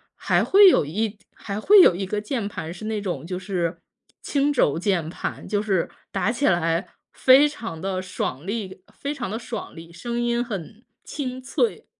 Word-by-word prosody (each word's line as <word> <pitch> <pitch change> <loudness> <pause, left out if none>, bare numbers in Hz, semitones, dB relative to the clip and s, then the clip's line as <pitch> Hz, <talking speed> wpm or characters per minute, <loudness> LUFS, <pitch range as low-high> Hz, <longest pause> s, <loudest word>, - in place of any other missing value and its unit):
还 - - +1
会 395 0 +8
有 250 - +3
1 210 +7 -2 0.2
还 200 -1 -5
会 400 - +7
有 185 - +6
1 190 +2 -3
个 205 +2 -2
键 215 -1 -3
盘， 165 -5 -6
是 185 +4 -9
那 215 -1 -2
种 175 -8 -4
就 180 +1 -4
是 180 -3 -2 0.4
轻 285 0 +1
轴 155 - +2
键 180 -4 0
盘， - - -5
就 205 -1 0
是 195 -5 0 0.2
打 230 - 0
起 275 +4 0
来 165 -1 +1 0.3
非 265 +3 +6
常 220 - -7
地 190 -1 -2
爽 175 -5 -4
利， 200 -3 -4
非 280 - -4
常 260 -8 -5
地 220 - -3
爽 235 -2 -7
利， 165 0 -11
声 235 +7 -4
音 240 0 +1
很 215 +1 -7 0.2
清 260 -3 -5
脆。 435 - -1
205 Hz, 190 characters per minute, -24 LUFS, 175-240 Hz, 0.4 s, 会